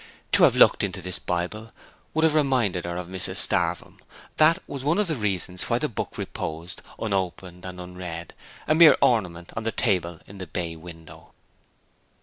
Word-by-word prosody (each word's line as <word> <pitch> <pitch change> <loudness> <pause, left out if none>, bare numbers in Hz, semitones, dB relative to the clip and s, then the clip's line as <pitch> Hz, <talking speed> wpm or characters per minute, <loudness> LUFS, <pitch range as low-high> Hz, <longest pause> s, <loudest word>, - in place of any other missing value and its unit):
To - - +6
have - - +3
looked - - +5
into 95 -1 -2
this 90 0 -1
Bible 90 +6 -3 0.4
would 160 - +2
have 160 -2 +4
reminded 125 - +1
her 85 0 -4
of 90 - -4
Mrs 95 +1 -3
Starvem; - - 0 0.4
that 160 +2 +5
was 140 -2 -6
one 150 +4 +2
of 210 - +2
the 160 -4 -1
reasons 95 -5 -2
why - - +2
the - - -1
book - - -5
reposed, 80 +3 -5 0.2
unopened 95 -3 -3
and 90 -1 -7
unread, 90 -2 -7 0.3
a - - +3
mere 160 0 +8
ornament 90 -8 +1
on 115 - -3
the 115 - -1
table 90 -8 0
in 100 0 -12
the 95 - -6
bay 85 +1 -4
window. 80 0 -13
90 Hz, 175 wpm, -25 LUFS, 85-115 Hz, 0.4 s, mere